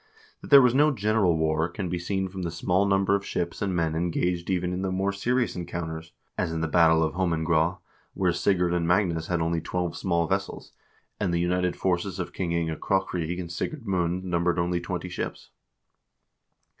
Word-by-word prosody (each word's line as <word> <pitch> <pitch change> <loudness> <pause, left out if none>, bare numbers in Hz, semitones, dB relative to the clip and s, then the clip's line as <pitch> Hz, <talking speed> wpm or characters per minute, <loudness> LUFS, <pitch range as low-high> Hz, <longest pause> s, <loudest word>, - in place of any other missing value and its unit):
That - - -10
there 140 -2 +9
was 125 -1 +4
no 145 +3 +5
general 105 - +2
war 80 +1 +1
can 95 +2 -4
be 90 0 -2
seen 95 +2 -2
from 95 0 -7
the 85 - -2
small 90 +4 +1
number 95 0 +2
of 100 0 +1
ships 85 -3 -3
and 95 -2 -1
men 80 -2 0
engaged 85 +1 -1
even 90 -1 0
in 90 - -3
the 95 -1 -1
more 95 +2 0
serious 120 +4 0
encounters, 80 -2 -5 0.3
as 90 -3 0
in 80 0 -2
the 80 - 0
battle 80 0 +4
of 80 - -1
Holmengraa, 85 -1 +1 0.4
where 90 -2 +2
Sigurd 90 -1 +1
and 85 -1 0
Magnus 85 -3 +1
had 90 -2 0
only 85 0 0
twelve 90 0 -2
small 85 -3 0
vessels, - - -3 0.5
and 95 -4 0
the 85 - +1
united 90 +1 0
forces 95 +1 -1
of 90 - -5
King 90 -3 -2
Inge 80 -2 -1
Krokryg 90 -3 -1
and 85 -2 -5
Sigurd 125 - -4
Mund 90 -2 0
numbered 90 -1 0
only 85 0 0
twenty 90 0 -4
ships. 90 - -6
90 Hz, 195 wpm, -26 LUFS, 85-95 Hz, 0.5 s, there